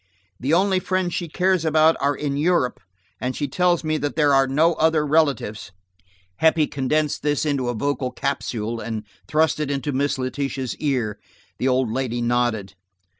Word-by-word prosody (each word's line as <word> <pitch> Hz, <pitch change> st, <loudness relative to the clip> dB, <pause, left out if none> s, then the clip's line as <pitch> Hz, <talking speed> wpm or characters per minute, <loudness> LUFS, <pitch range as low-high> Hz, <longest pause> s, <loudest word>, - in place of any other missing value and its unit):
The 135 Hz, +4 st, -1 dB
only 190 Hz, +2 st, +3 dB
friends 185 Hz, -1 st, -1 dB
she 175 Hz, -, -2 dB
cares 185 Hz, +1 st, +1 dB
about 160 Hz, 0 st, +4 dB
are 140 Hz, +1 st, +1 dB
in 145 Hz, -1 st, -2 dB
Europe, 150 Hz, -3 st, +1 dB, 0.4 s
and 125 Hz, +1 st, -2 dB
she 145 Hz, -, -2 dB
tells 175 Hz, +4 st, +1 dB
me 155 Hz, 0 st, 0 dB
there 145 Hz, 0 st, +1 dB
are 135 Hz, 0 st, +4 dB
no 155 Hz, +6 st, +3 dB
other 160 Hz, -1 st, +2 dB
relatives." 140 Hz, -, 0 dB, 0.7 s
Heppie 160 Hz, -1 st, +4 dB
condensed 145 Hz, +2 st, -1 dB
this 145 Hz, +1 st, 0 dB
into 140 Hz, -4 st, 0 dB
a 120 Hz, -, -2 dB
vocal 135 Hz, +2 st, -1 dB
capsule, 120 Hz, -5 st, -3 dB
and 110 Hz, -2 st, -4 dB, 0.2 s
thrust 155 Hz, 0 st, +2 dB
it 150 Hz, -2 st, -2 dB
into 140 Hz, 0 st, -2 dB
Miss 140 Hz, +1 st, 0 dB
Letitia's 130 Hz, 0 st, -3 dB
ear. 125 Hz, -8 st, -1 dB, 0.4 s
The 130 Hz, -, 0 dB
old 130 Hz, -3 st, +1 dB
lady 120 Hz, -1 st, -2 dB
nodded. 120 Hz, -5 st, 0 dB
140 Hz, 165 wpm, -22 LUFS, 130-155 Hz, 0.7 s, about